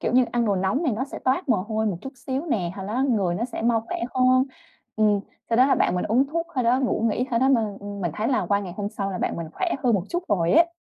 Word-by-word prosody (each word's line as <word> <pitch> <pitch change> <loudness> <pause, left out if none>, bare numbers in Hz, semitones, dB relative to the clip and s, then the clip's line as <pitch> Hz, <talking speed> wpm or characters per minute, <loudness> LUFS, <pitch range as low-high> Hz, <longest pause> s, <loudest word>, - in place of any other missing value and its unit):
kiểu - - -1
như, 255 0 +5
ăn 240 -1 +1
đồ 205 -3 +1
nóng 195 - 0
này 285 -8 +1
nó 245 +5 -1
sẽ - - -8
toát 265 +4 +1
mồ 235 - +4
hôi 220 +1 -1
một 195 - -1
chút 270 - -8
xíu 265 +5 -4
nè, 185 - 0
hồi 195 -1 -6
nó 240 +5 -1
người 195 -6 +1
nó 215 +6 -1
sẽ 240 -2 -5
mau 230 -1 +3
khỏe - - -3 0.2
hơn. 255 0 +4 0.5
Ừm, 210 -2 +3 0.3
sau 230 - +3
đó 255 +2 +6
là 275 - +4
bạn - - +2
mình 180 - -1
uống 250 +6 +2
thuốc 335 +4 -2
thôi 255 - 0
đó 245 +3 +3
ngủ 255 - 0
nghỉ 250 +4 -1
thôi 230 - +2
đó 265 +2 +3
mà, 255 -4 +4 0.2
ưm, 200 0 -7
mình 175 -3 -1
thấy 215 +2 -1
là 260 - +1
qua 200 0 +2
ngày 185 -3 -6
hôm 205 -1 -2
sau 200 -2 -4
là 185 - -4
bạn - - -1
mình 170 - -4
khỏe 360 -2 -1
hơn 240 -2 +4
một 190 -3 0
chút 350 +1 -2
rồi 175 -6 +2
ấy. 335 +2 +5
230 Hz, 305 wpm, -24 LUFS, 200-260 Hz, 0.5 s, đó